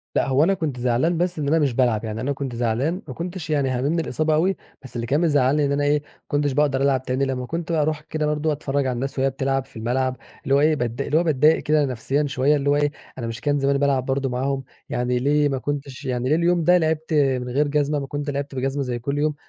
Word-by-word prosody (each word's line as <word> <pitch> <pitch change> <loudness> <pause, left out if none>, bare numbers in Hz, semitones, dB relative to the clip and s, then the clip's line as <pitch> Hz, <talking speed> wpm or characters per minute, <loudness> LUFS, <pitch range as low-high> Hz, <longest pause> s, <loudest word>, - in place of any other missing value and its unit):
لأ، - - +2
هو 135 +2 +3
أنا 195 +4 +3
كُنت 155 -8 -3
زعلان 125 +8 +1
بس 175 -1 -1
إن 145 - -1
أنا 160 +2 +3
مش 140 -5 +1
بالعب. 120 -4 +2
يعني 110 0 -4
أنا 140 +2 -1
كنت 135 -3 -5
زعلان 125 - 0
ما 130 - -6
كُنتش 170 0 -6
يعني 140 -3 +1
هاممني 140 +7 0
الإصابة 155 +1 0
أوي، 185 +5 +2 0.3
بس 130 - -11
اللي 115 0 -3
كان 145 +5 +2
مزعلني 145 -2 +3
إن 140 - 0
أنا 145 +1 +1
إيه، 145 +1 +3
ما - - -26 0.2
كنتش 145 -1 0
باقدر 135 -1 +1
ألعب 135 -2 +2
تاني 130 +1 0
لما 130 -2 -3
كنت 165 +3 -4
أروح 155 -1 0
كده 155 0 -3
برضه 150 +1 0
أتفرج 140 -2 -1
على 125 - 0
الناس 135 +2 -3
وهي 135 - +3
بتلعب 135 0 -1
في - - -18
الملعب، 130 +3 -1 0.3
اللي 135 - +2
هو 140 - +4
إيه 155 +1 +4
باتض 120 -2 -2
اللي 150 +2 +1
هو 170 - +3
باتضايق 155 0 +4
كده 150 -1 +3
نفسيًا 135 +4 -1
شوية 135 +2 +2
اللي 145 0 0
هو 145 - +4
إيه، 145 0 +1 0.3
أنا 120 -3 -4
مش 115 -1 -6
كان 145 -1 +1
زماني 140 0 +2
بالعب 135 -2 +1
برضه 135 0 -1
معاهم؟ 135 +2 -1 0.3
يعني 125 0 0
ليه 145 +2 +2
ما 135 - -1
كنتش 140 0 -5
يعني 125 -1 -1
ليه 155 - +4
اليوم 170 0 +2
ده 180 +3 +5
لعبت 160 -1 -1
من 130 -4 +2
غير 145 +4 +1
جزمة؟ 145 0 +1
ما 135 - -5
كنت 145 +1 -4
لعبت 140 0 -4
بجزمة 135 +2 -1
زي 120 -2 -3
كل 140 +4 -3
يوم. 150 0 +1
140 Hz, 255 wpm, -23 LUFS, 130-150 Hz, 0.3 s, ده